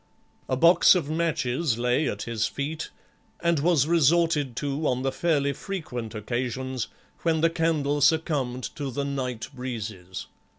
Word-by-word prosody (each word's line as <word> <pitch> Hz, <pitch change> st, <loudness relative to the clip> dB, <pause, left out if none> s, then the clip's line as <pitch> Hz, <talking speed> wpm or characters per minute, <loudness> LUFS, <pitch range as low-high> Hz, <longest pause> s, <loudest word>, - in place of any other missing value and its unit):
A 130 Hz, -, +1 dB
box 170 Hz, +5 st, +7 dB
of 155 Hz, -4 st, -1 dB
matches 155 Hz, -5 st, 0 dB
lay 125 Hz, +5 st, +1 dB
at -, -, -4 dB
his 115 Hz, -2 st, -1 dB
feet 150 Hz, +3 st, -4 dB, 0.5 s
and 170 Hz, -2 st, +2 dB
was 155 Hz, -2 st, +3 dB
resorted 160 Hz, -4 st, +3 dB
to 145 Hz, +3 st, -1 dB
on 125 Hz, 0 st, 0 dB
the 135 Hz, -, +1 dB
fairly 145 Hz, -3 st, +1 dB
frequent 125 Hz, -, -5 dB
occasions 125 Hz, +3 st, -3 dB, 0.3 s
when 160 Hz, -2 st, +1 dB
the 165 Hz, 0 st, +4 dB
candle 155 Hz, -4 st, +1 dB
succumbed 140 Hz, -5 st, +2 dB
to 145 Hz, -3 st, -3 dB
the 140 Hz, +2 st, -2 dB
night 125 Hz, -5 st, -3 dB
breezes. 110 Hz, -8 st, -6 dB
140 Hz, 140 wpm, -26 LUFS, 125-160 Hz, 0.5 s, box